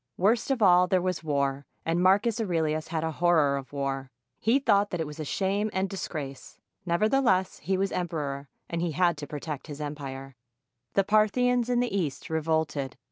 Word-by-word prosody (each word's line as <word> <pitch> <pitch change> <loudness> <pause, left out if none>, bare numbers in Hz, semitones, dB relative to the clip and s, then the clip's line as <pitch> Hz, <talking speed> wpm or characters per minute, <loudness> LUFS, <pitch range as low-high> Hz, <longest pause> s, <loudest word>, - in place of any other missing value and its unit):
Worst 220 +8 +2
of 260 -5 +1
all, 180 -1 +6
there 185 0 +3
was 180 -2 -2
war; 140 -2 -1 0.2
and 165 +2 +1
Marcus 205 +5 +3
Aurelius 160 -5 0
had 160 -1 -2
a 160 - -1
horror 160 -4 +3
of 135 -2 -6
war. 135 -1 -3 0.3
He 230 +4 +3
thought 205 -7 +3
that 175 - -3
it 160 - -1
was 150 +1 -9
a - - -2
shame 195 +7 0
and 190 +1 0
dis 195 0 -5
grace. 140 -4 -7 0.3
Nevertheless, 190 +1 +2
he 185 +5 -1
was 195 0 0
emperor, 145 -6 -3 0.2
and 170 0 -3
he 170 -2 -1
had 175 0 +3
to 145 0 -6
protect 150 0 -6
his 145 -1 -7
empire. 135 -3 -6 0.6
The 195 - +4
Parthians 235 +4 +2
in 245 0 +2
the 245 -5 -1
East 160 -5 -2
revolted. 160 -4 -1
170 Hz, 190 wpm, -27 LUFS, 145-195 Hz, 0.6 s, all